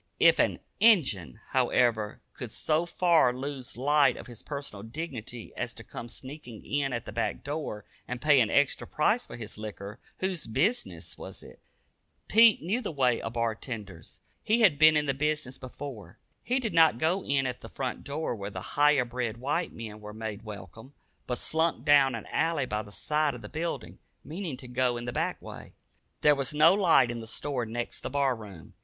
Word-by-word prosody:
If - - +6
an - - +3 0.2
"Injun," 130 - +4
however, 110 -4 +1
could - - -7
so 160 +2 0
far 170 -6 +4
lose 130 0 -5
sight 140 +1 +3
of - - -9
his 120 -3 -11
personal 140 -9 -6
dignity 120 -2 -7
as 125 -1 -4
to 115 - -9
come 120 +2 -8
sneaking 130 -3 -9
in 140 -1 0
at 120 -1 -3
the - - -7
back - - -2
door, 140 -8 -4 0.2
and 125 0 -4
pay 145 -2 +5
an 110 - +2
extra 145 -1 +2
price 220 +11 +1
for - - -8
his 110 -2 -8
liquor, 105 0 -7 0.2
whose 185 -6 -2
business 180 - -1
was - - -9
it? - - -14 0.7
Pete 225 -5 +6
knew 205 +9 0
the 225 - -3
way 130 -6 +1
of 115 - -5
bar 115 -1 0
tenders. 105 - -8 0.2
He 225 +3 +2
had 170 -10 +5
been 155 0 +7
in 150 - +1
the 140 - +1
business 150 -2 -1
before. 130 -3 -8 0.3
He 255 +2 +1
did 230 -4 -3
not 160 -7 +6
go 175 +8 +1
in 135 -1 +1
at 125 -1 -3
the - - -9
front 130 -2 -4
door 145 -2 -3
where 100 -2 -5
the 95 -2 -7
higher 145 -3 +5
bred 120 -2 -3
white 145 +8 -1
men 110 -2 -8
were 105 0 -8
made 110 -1 -5
welcome, 110 +4 -10 0.3
but 125 - -1
slunk 160 -3 0
down 140 -4 +5
an 115 - -6
alley 165 -4 +1
by 105 -3 -2
the 105 -1 -12
side 150 +4 0
of 120 - -10
the - - -8
building, 165 +2 -4 0.2
meaning 160 -3 -5
to 125 - -11
go 125 0 +1
in 120 - -5
the 120 - -4
back - - -1
way. - - -10 0.5
There 150 - +6
was 140 +1 -2
no 155 +4 +7
light 165 - +4
in 120 - -5
the 110 - -8
store 125 0 -2
next 120 +2 -4
the - - -5
bar 140 -1 +1
room. 100 -7 -11
130 Hz, 200 wpm, -29 LUFS, 115-155 Hz, 0.7 s, been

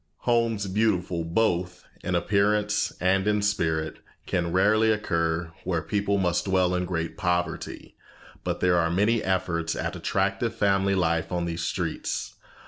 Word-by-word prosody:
Homes 115 -4 +1
beautiful 95 -4 0
both 90 0 0 0.2
in 95 - -1
appearance 105 +3 +1
and 95 +2 +2
in 105 -1 +2
spirit 80 -6 0 0.3
can 85 -2 -1
rarely 105 +5 +4
occur 85 -5 -1
where 85 -3 -1
people 100 -1 0
must 90 -3 +1
dwell 95 -2 +2
in 90 0 0
great 85 -2 -3
poverty, 90 -3 -2 0.5
but - - -3
there 90 -1 +4
are 85 -1 +2
many 105 +6 +2
efforts 90 -3 -1
at - - -3
attractive 100 +4 -1
family 100 -2 +2
life 85 -3 0
on 90 -1 -1
these 85 0 -3
streets. - - -3
95 Hz, 140 wpm, -26 LUFS, 85-105 Hz, 0.5 s, rarely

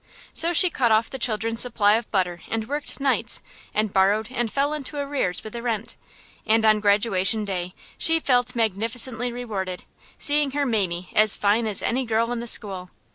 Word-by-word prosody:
So 335 - +2
she 350 +1 +6
cut 240 -6 +1
off 220 +1 +2
the 265 - -6
children's 225 0 0
supply 210 -4 +3
of 225 +1 -1
butter 180 -3 -1
and 220 -1 -3
worked 290 +2 -5
nights 275 -1 -1 0.3
and 215 -2 -1
borrowed 205 +4 +2
and 240 -3 -2
fell 285 +2 0
into 295 -1 -6
arrears 280 -11 -1
with 215 - -9
the 235 - -5
rent; 230 -2 -4 0.5
and 220 0 +2
on 215 -1 +4
Graduation 205 0 +2
Day 180 -2 -4 0.2
she 325 0 +3
felt 250 -4 +1
magnificently 230 +3 -1
rewarded, 200 -7 -5 0.3
seeing 290 -2 +2
her 285 0 0
Mamie 185 -7 -1
as 215 0 +6
fine 215 +3 +1
as 205 -3 +1
any 260 +3 0
girl 230 0 0
in 240 - -3
the 235 - -6
school. 190 -5 0
225 Hz, 185 wpm, -23 LUFS, 205-250 Hz, 0.5 s, she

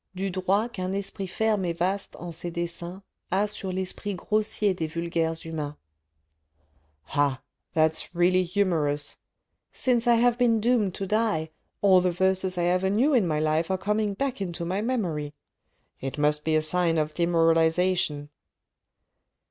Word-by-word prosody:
Du 195 +1 -2
droit 190 +4 +1
qu'un 185 0 -3
esprit 195 -1 -3
ferme 210 +1 0
et 170 - -1
vaste 190 +3 -2
en 175 0 -7
ses 170 +2 -3
desseins 170 +2 -5 0.3
A 195 +3 +2
sur 200 -2 -4
l'esprit 190 +2 -2
grossier 210 +1 0
des 160 -3 -2
vulgaires 165 -1 -1
humaines. 150 -2 -4 0.8
" 75 0 -37
Ah! 140 -2 +2 0.4
that's 160 +2 +1
really 180 +1 +4
humorous; 170 -6 0 0.5
since 245 -2 0
I 240 - +6
have 240 +1 +3
been 235 -2 +3
doomed 215 -4 +1
to 195 - -3
die, 205 -6 0 0.3
all 190 -2 +6
the 180 - +2
verses 190 +1 0
I 175 - +1
ever 180 +2 +2
knew 245 +10 +3
in 225 -8 +3
my 155 -2 0
life 155 +2 +1
are 190 - +1
coming 210 +1 -1
back 265 -1 -2
into 175 -3 -4
my 185 +4 -1
memory. 170 - -2 0.6
It 135 +2 -5
must 150 0 +1
be 160 0 +1
a 155 - +3
sign 165 +1 +2
of 155 0 0
demoralisation." 165 -1 +2
180 Hz, 155 wpm, -26 LUFS, 160-200 Hz, 0.8 s, I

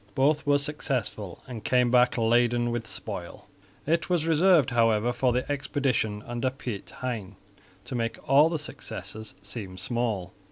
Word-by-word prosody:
Both 145 +3 +2
were 145 0 +5
successful 135 - -3
and 120 -4 -7
came 125 -1 +3
back 125 0 +4
laden 120 +1 +3
with 120 -2 -3
spoil. 100 -3 -6 0.4
It 165 +4 +1
was 175 -3 +1
reserved, 165 -3 +4
however, 115 0 +3
for 125 0 +2
the 125 +1 -1
expedition 135 -7 -1
under 120 +2 -1
Piet 125 -6 -6
Hein 110 -6 -4 0.5
to - - -6
make 115 -2 -1
all 140 +3 +6
other 165 0 -1
successes 110 -7 -7
seem 100 -3 -7
small. 110 -6 -2
120 Hz, 150 wpm, -27 LUFS, 110-140 Hz, 0.5 s, all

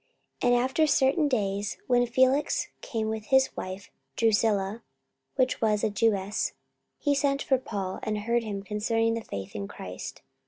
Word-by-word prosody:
44:024:024 245 - +3
And 240 - +3
after 285 +5 +2
certain 285 +2 +3
days, 205 -5 -1
when 245 -1 +3
Felix 260 +4 +2
came 220 -2 -2
with 220 -1 -4
his 265 +2 +3
wife 185 +2 -6 0.2
Drusilla, 215 -1 +2 0.5
which 255 -1 +1
was 210 -2 +2
a 215 - +2
Jewess, 205 -1 +1 0.4
he 290 - +1
sent 280 0 +1
for 265 -2 +2
Paul, 195 -6 -4
and 215 0 -2
heard 235 +3 +1
him 205 -3 -5
concerning 225 +2 0
the 230 - -2
faith 100 - -7
in 100 -1 -4
Christ. 90 -1 -8
225 Hz, 160 wpm, -28 LUFS, 205-255 Hz, 0.5 s, 44:024:024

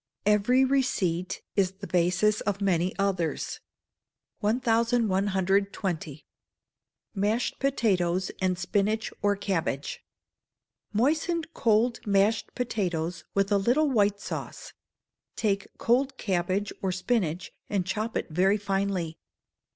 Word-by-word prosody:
[EVERY 210 +6 +4
RECEIPT 190 -10 0
IS 190 -2 +2
THE 200 +1 -9
BASIS 185 +4 +2
OF 200 -1 -1
MANY 185 -2 +1
OTHERS.] 185 -6 -1 0.8
1120. 200 - +1 0.9
Mashed 215 +4 0
Potatoes 190 -9 +1
and 185 -1 +1
Spinach 205 +4 0
or 205 0 +2
Cabbage. 170 -8 -2 0.9
Moisten 310 +9 +1
cold 230 0 +2
mashed 205 +2 +2
potatoes 180 -8 -2
with 200 +1 +1
a 200 - +4
little 275 +9 +2
white 205 -4 +2
sauce: - - -6 0.6
take 200 -3 0
cold 265 +3 +1
cabbage 190 +1 -1
or 190 - 0
spinach, 185 -3 -1 0.2
and 195 -3 0
chop 215 +4 -2
it - - -3
very 190 +5 +3
finely. 195 -5 -2
200 Hz, 105 wpm, -27 LUFS, 185-225 Hz, 0.9 s, EVERY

